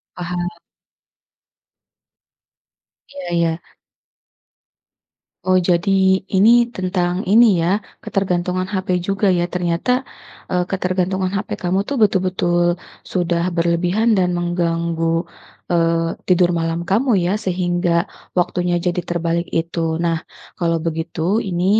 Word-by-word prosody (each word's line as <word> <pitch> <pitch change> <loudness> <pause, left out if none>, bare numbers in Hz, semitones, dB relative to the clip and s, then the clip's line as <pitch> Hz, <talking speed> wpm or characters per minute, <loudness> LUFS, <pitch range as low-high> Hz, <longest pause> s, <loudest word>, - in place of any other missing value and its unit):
Paham. 175 0 -3 2.6
Iya 280 0 -8
iya. 170 -1 +2 1.9
Oh. 185 0 +4
Jadi 175 +3 +1 0.5
ini 210 +4 +6 0.3
tentang 180 -1 -1
ini 230 +4 +7 0.2
ya, 170 - +1 0.3
ketergantungan 185 -1 -1
HP 185 -1 0
juga 195 +3 -1
ya, 175 -1 +1
ternyata, 175 +5 0 0.6
eee, 180 -1 +1
ketergantungan 185 0 0
HP 200 +2 -3
kamu 180 +2 +1
tuh 280 - -1
betul-betul 180 -3 +2 0.4
sudah 170 -2 +1
berlebihan 175 +7 +2
dan 180 -1 +2
mengganggu, 170 -1 0 0.4
eee, 165 -1 +2 0.2
tidur 180 -1 +4
malam 165 0 -1
kamu 235 +6 +2
ya, 180 - +1
sehingga 175 -2 +1 0.3
waktunya 180 0 +1
jadi 180 0 0
terbalik 170 0 -1
itu. 165 -1 -1
Nah, 170 -1 +1 0.4
kalau 165 -1 +1
begitu, 165 +5 -1
ini 175 0 -1
175 Hz, 105 wpm, -19 LUFS, 170-185 Hz, 2.6 s, ini